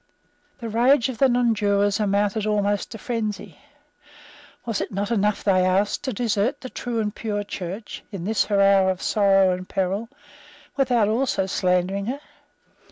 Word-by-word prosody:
The 235 -4 -6
rage 240 +3 +3
of 245 - -6
the 270 - +5
nonjurors 205 -5 +2
amounted 205 +1 0
almost 205 -1 0
to 225 - -8
frenzy. 215 -2 -4 1.1
Was 230 -4 -2
it - - -4
not 200 +3 -3
enough, 210 -2 +1
they 185 -2 +3
asked, 190 +3 +1
to 260 - -1
desert 230 +3 -1
the 255 - -8
true 240 -2 -3
and 210 -2 -1
pure 205 -3 -3
Church, 195 +2 -7
in 195 -5 -6
this 215 +3 +1
her 205 -2 0
hour 195 -1 +5
of 185 -1 -1
sorrow 195 -2 +3
and 185 0 -7
peril, 195 +4 -2 0.7
without 250 -6 +2
also 225 -3 0
slandering 185 +2 0
her? 270 +4 -3
205 Hz, 160 wpm, -23 LUFS, 195-230 Hz, 1.1 s, the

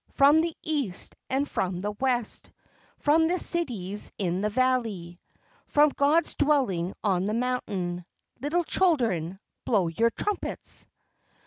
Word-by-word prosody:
From 290 +3 +5
the 330 -1 -3
East 280 - -2
and 275 +2 +1
from 180 -7 -2
the 205 +2 -2
West, 245 +1 -1 0.5
From 320 +2 +3
the 360 +2 +1
cities 225 - -2
in 185 -2 -1
the 210 - +1
valley, 220 -8 0 0.5
From 295 +1 +5
God's 290 +4 +2
dwelling 250 - +1
on 190 -3 +1
the 210 +2 -1
mountain, 200 -8 -2 0.4
Little 320 +5 0
children, 230 - +1 0.3
blow 195 -7 +2
your 230 +8 +2
trumpets! 410 - -3
240 Hz, 125 wpm, -27 LUFS, 190-290 Hz, 0.5 s, From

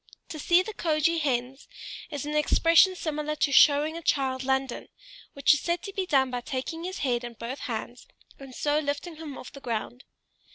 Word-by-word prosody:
"To 310 - -7
see 345 +4 +4
the 435 - -7
Kjoge 330 -1 +1
hens," 260 -1 -2 0.4
is 290 -3 -5
an 300 +1 -3
expression 330 +4 +4
similar 305 -3 -3
to 290 - +1
"showing 295 +3 +5
a 335 - -6
child 265 -4 0
London," 265 -1 -1 0.5
which 280 +1 +4
is 295 - 0
said 345 +5 -2
to 395 - -7
be 385 -2 -2
done 265 -5 +2
by 245 0 -3
taking 290 +7 -5
his 370 +1 -5
head 245 -2 0
in 240 -1 -6
both 235 +6 -6
bands, 240 +1 -6 0.3
and 270 -2 -11
so 295 0 +1
lifting 300 +3 -4
him 305 -4 -8
off - - -10
the 275 - -11
ground. 240 0 -4
285 Hz, 195 wpm, -27 LUFS, 260-325 Hz, 0.5 s, showing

